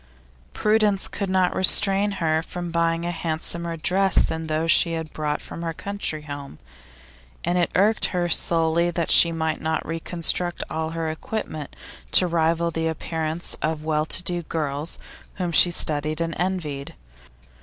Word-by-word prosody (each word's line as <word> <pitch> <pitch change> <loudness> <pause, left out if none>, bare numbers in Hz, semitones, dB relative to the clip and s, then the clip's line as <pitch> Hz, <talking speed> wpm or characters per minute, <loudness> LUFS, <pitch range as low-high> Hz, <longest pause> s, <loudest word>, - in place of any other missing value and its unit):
Prudence 210 -2 +2
could 200 -2 -4
not 185 -1 +1
restrain 195 +2 +6
her 160 -4 0
from 175 +1 -6
buying 165 0 0
a 175 - -1
handsomer 170 0 -4
dress 190 +3 +1
than 160 0 +1
those 160 +1 +1
she 170 +1 +3
had 160 -1 -5
brought 150 -1 -3
from - - -8
her 165 -1 -3
country 200 -4 -2
home, 145 - -8 0.9
and 175 +1 0
it 175 - +1
irked 210 +3 +3
her 180 -1 -1
sorely 165 0 +2
that 170 -1 -1
she 170 - +7
might 160 -1 -2
not 160 0 -2
reconstruct 170 +1 0
all 160 0 -2
her 165 -1 -3
equipment 155 -3 -6 0.4
to 185 - +6
rival 170 0 +1
the 165 0 -2
appearance 160 +1 -4
of 155 0 -2
well 155 0 0
to 180 - 0
do 175 0 -1
girls 155 -1 -3 0.4
whom 180 -3 -3
she 175 - +5
studied 155 -2 +1
and 165 0 -2
envied. 165 -7 -3
165 Hz, 155 wpm, -23 LUFS, 160-175 Hz, 0.9 s, she